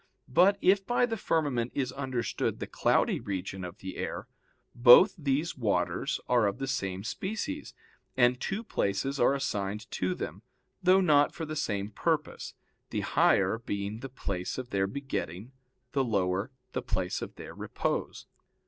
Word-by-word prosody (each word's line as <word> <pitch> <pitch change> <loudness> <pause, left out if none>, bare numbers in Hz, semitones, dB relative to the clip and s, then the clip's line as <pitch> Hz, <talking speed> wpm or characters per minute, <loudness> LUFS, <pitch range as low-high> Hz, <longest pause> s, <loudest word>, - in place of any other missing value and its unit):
But 185 +6 +6
if 195 +1 +5
by 245 +4 +2
the 230 -2 -2
firmament 145 - 0
is 135 -2 0
understood 130 -3 -2
the - - -3
cloudy - - +2
region 95 -1 -4
of 90 +2 -7
the 95 0 -7
air, - - -4 0.5
both 125 - +8
these 150 0 -1
waters 115 -6 0
are 120 -4 +4
of 100 - -2
the 135 - -3
same 95 -8 -2
species, 220 - -4 0.4
and 125 0 +4
two 210 +4 -2
places 135 - -1
are 135 - +4
assigned 105 -5 -2
to 90 0 -1
them, - - -6 0.4
though 185 +1 +5
not 145 -5 +4
for 165 - -4
the 155 0 -5
same 100 -7 -2
purpose, 155 +5 -2 0.3
the - - -2
higher 95 +4 +3
being 100 -1 -4
the 135 +3 -7
place 95 -8 -4
of 130 -1 -6
their 95 -1 +1
begetting, 105 - -4 0.4
the 135 -1 +1
lower, 100 -2 0 0.2
the - - -2
place 90 -1 -2
of - - -6
their - - -9
repose. - - -3
125 Hz, 155 wpm, -29 LUFS, 100-150 Hz, 0.5 s, both